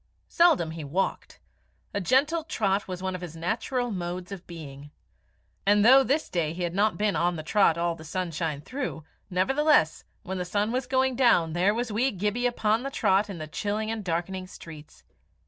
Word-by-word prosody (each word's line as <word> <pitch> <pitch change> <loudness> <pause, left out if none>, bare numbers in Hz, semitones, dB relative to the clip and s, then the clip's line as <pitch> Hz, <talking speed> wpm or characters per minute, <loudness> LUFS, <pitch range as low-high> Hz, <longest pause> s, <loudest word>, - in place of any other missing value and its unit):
Seldom 320 - +4
he 160 -1 -6
walked. 165 +7 -3 0.5
A 200 - -1
gentle 290 - +2
trot 205 - -1
was 185 -1 -6
one 190 0 -2
of 185 - -5
his 170 -3 -7
natural 240 +9 -2
modes 180 0 -4
of 190 -2 -8
being. 145 -4 -9 0.7
And 205 +1 +4
though 265 +3 +8
this 285 +4 0
day 160 -3 -1
he 180 +1 -4
had 170 -1 -2 0.2
been 210 -1 +1
on 175 +1 +1
the 155 - -6
trot 170 -1 +3
all 170 0 0
the 160 - -11
sunshine 160 -3 -3
through, 255 - -5 0.3
nevertheless, 265 - +2 0.2
when 190 0 -4
the - - -1
sun 205 +4 -1
was 250 0 -2
going 260 0 +1
down 180 -11 +3
there 185 +5 +2
was 235 -1 -2
wee 240 +6 +2
Gibbie 210 +4 -1
upon 225 -2 +1
the 275 - -3
trot 205 -5 +2
in 195 - -6
the 155 - -5
chilling 210 +7 -2
and 225 -2 -4
darkening 185 +2 -3
streets. 155 -4 -12
190 Hz, 185 wpm, -27 LUFS, 170-235 Hz, 0.7 s, though